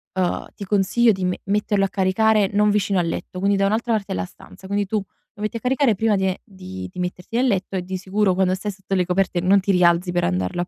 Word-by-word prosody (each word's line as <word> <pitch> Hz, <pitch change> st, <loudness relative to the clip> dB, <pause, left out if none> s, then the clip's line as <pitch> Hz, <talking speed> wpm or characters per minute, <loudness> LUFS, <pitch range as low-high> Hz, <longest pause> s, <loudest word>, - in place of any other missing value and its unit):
uhm, 185 Hz, -2 st, -1 dB
ti 200 Hz, -, -7 dB
consiglio 210 Hz, +4 st, +3 dB
di 190 Hz, -2 st, -3 dB
me 180 Hz, 0 st, -1 dB
metterlo 205 Hz, 0 st, +1 dB
a -, -, -3 dB
caricare 200 Hz, +2 st, +2 dB
non 210 Hz, +1 st, +3 dB
vicino 200 Hz, -2 st, +1 dB
al 170 Hz, -, 0 dB
letto, 180 Hz, +2 st, -5 dB
quindi 200 Hz, +1 st, +2 dB
da 195 Hz, -, +2 dB
un'altra 225 Hz, +4 st, 0 dB
parte 210 Hz, -3 st, -2 dB
della 90 Hz, 0 st, -2 dB
stanza. 190 Hz, -, -15 dB
Quindi, 200 Hz, +1 st, 0 dB
tu 215 Hz, +3 st, -1 dB
lo 205 Hz, +1 st, -10 dB
metti 215 Hz, +2 st, -2 dB
a -, -, -6 dB
caricare 260 Hz, -2 st, +2 dB
prima 220 Hz, +2 st, +2 dB
di 190 Hz, -1 st, 0 dB
e 185 Hz, -, -3 dB
di 95 Hz, -, -9 dB
di -, -, -9 dB
metterti 180 Hz, +4 st, -5 dB
nel 255 Hz, +2 st, +3 dB
letto, 195 Hz, -4 st, -1 dB
e 185 Hz, -, -1 dB
di 185 Hz, +1 st, -4 dB
sicuro, 195 Hz, +1 st, +1 dB
quando 185 Hz, 0 st, +2 dB
stai 205 Hz, +2 st, -4 dB
sotto 195 Hz, 0 st, -4 dB
le 180 Hz, -1 st, +2 dB
coperte, 180 Hz, 0 st, 0 dB
non 190 Hz, +3 st, +4 dB
ti 195 Hz, +1 st, 0 dB
rialzi 175 Hz, -1 st, +3 dB
per 175 Hz, -, 0 dB
andarlo 90 Hz, -, -1 dB
a 175 Hz, -, -3 dB
195 Hz, 260 wpm, -22 LUFS, 180-210 Hz, -, non